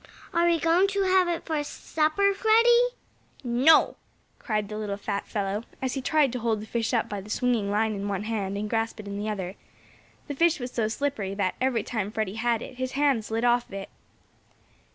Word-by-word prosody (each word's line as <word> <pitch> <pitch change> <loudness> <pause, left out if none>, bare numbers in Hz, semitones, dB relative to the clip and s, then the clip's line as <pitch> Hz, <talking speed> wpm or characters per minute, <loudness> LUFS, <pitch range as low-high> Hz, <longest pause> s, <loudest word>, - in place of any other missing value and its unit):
"Are 340 0 +3
we 340 -1 +3
going 340 +4 +3
to 395 0 0
have 370 -1 +4
it 345 -1 -2
for 310 -2 -1
supper, 315 +7 +1
Freddie?" 470 +3 +5 0.6
"No!" 255 +6 +4 0.4
cried 215 -4 -2
the 210 - -6
little 205 -2 -3
fat 200 0 -3
fellow, 205 +1 -2 0.2
as 260 -1 -2
he 270 - -3
tried 290 -1 +2
to 250 - -2
hold 225 -2 0
the 210 - -7
fish 225 0 -2
up 235 -3 +1
by 205 -1 -5
the 205 - -13
swinging 230 -2 0
line 215 +2 +1
in 200 0 -4
one 200 -1 -2
hand, 205 -3 -2
and 210 +1 -3
grasp 225 +1 -1
it 210 - -8
in 200 0 -5
the 210 +1 -2
other. 190 -2 -4 0.7
The 290 - -3
fish 335 +2 +2
was 245 0 -5
so 225 -3 0
slippery 220 -5 -2
that, 195 -2 0
every 250 -4 +1
time 210 -4 -3
Freddie 215 -3 -2
had 230 +1 0
it, 255 - -10
his 255 0 -3
hand 275 -5 +2
slid 225 +2 -1
off 240 0 +3
of - - -16
it. 195 0 -6
230 Hz, 215 wpm, -26 LUFS, 210-295 Hz, 0.7 s, Freddie